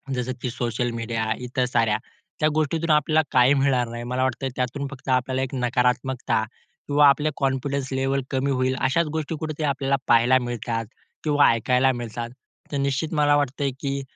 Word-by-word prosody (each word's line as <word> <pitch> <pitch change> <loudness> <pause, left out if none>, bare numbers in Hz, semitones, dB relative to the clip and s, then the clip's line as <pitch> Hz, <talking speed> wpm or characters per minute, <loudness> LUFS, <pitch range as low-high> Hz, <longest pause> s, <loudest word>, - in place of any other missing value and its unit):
जसं 125 0 -2
की 125 - -2
social 120 0 -2
media 115 -1 -2 0.2
इतर 125 +1 0
साऱ्या 115 -3 +1 0.4
त्या 155 - +4
गोष्टीतून 160 +2 0
आपल्याला 155 +1 +3
काही 125 +2 +5
मिळणार 135 -3 +2
नाही 120 0 -6
मला 125 +2 -1
वाटतं 130 +1 -1
त्यातून 135 +3 -2
फक्त 135 -1 -9
आपल्याला 130 +1 +1
एक 135 - -5
नकारात्मकता 125 -1 0 0.4
किंवा 145 0 +5
आपले 150 +2 +2
कॉन्फिडन्स 135 0 -1
लेव्हल 135 +1 0
कमी 135 +1 0
होईल 130 0 +1
अशाच 150 +6 +2
गोष्टी 160 0 -2
कुठे 155 -1 -3
ते - - -1
आपल्याला 140 -1 +1
पाहायला 120 +2 +5
मिळतात 120 -2 -3 0.4
किंवा 145 -2 +4
ऐकायला 125 +3 +2
मिळतात. 120 -1 -5 0.4
तर 145 - -1
निश्चित 140 +3 -1
मला 145 -1 +4
वाटतंय 140 -1 0
की 140 -1 -2
130 Hz, 170 wpm, -24 LUFS, 125-140 Hz, 0.4 s, काही